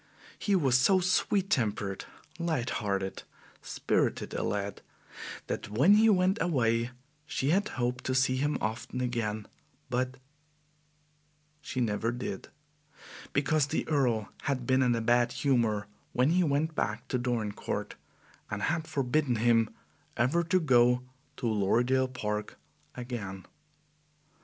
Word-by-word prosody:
He 205 - +1
was 135 -8 +4
so 190 +9 +5
sweet 190 +2 +1
tempered, 105 -5 0 0.3
light 160 -8 -1
hearted, 100 -2 -2 0.4
spirited - - -1
a - - -2
lad, 100 -1 -2 0.6
that - - -4
when 135 - +5
he 220 +2 +6
went 190 +1 +3
away, 115 -7 +1 0.4
she 145 -1 0
had 200 +4 +2
hoped 125 0 -1
to 130 - 0
see 130 0 +3
him 145 +3 0
often 110 +3 -3
again; 115 -4 -2 0.4
but 130 +1 -1 1.4
she 130 - -4
never 115 0 0
did, 120 -5 -5 0.8
because 145 +1 +2
the 160 - -2
Earl 125 -8 +1 0.2
had 130 -3 -1
been 130 +1 +3
in 125 -2 +3
a 115 - -1
bad 120 +1 +3
humor 115 -7 +1 0.3
when 125 +5 +3
he 180 +1 +3
went 155 +1 +1
back - - -2
to 125 - 0
Dorincourt, 120 -4 -2 0.6
and 105 0 -3
had 160 0 0
forbidden 135 -1 +1
him 115 -1 +3 0.5
ever 140 +9 +2
to 185 +3 +3
go 125 -5 +4 0.3
to 125 - -4
Lorridaile 120 +5 +2
Park 105 -4 -3 0.4
again. 110 -7 -6
125 Hz, 130 wpm, -30 LUFS, 115-145 Hz, 1.4 s, he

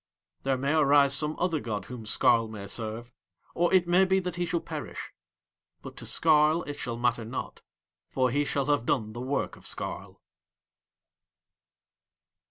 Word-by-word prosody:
There 135 -1 0
may 140 +3 0
arise 140 -2 +5
some 150 +1 0
other 170 -3 0
god 110 -5 -4
whom 125 -3 -8
Skarl 115 +1 +4
may 105 -2 -8
serve, 115 +3 -4 0.4
or 175 0 +1
it 185 -2 +4
may 180 +2 +5
be 190 0 +2
that 180 -2 -4
he 175 0 -2
shall 170 0 0
perish; - - -7 0.7
but - - -9
to - - -6
Skarl 155 +1 +3
it 145 - -3
shall 120 -5 -5
matter 120 -1 0
not, 115 +4 -6 0.5
for 130 -2 +1
he 145 +3 +1
shall 140 -1 -1
have 145 -4 0
done 110 -5 0
the 120 - -6
work 135 +3 -2
of - - -18
Skarl. - - -6
140 Hz, 165 wpm, -28 LUFS, 120-160 Hz, 0.7 s, arise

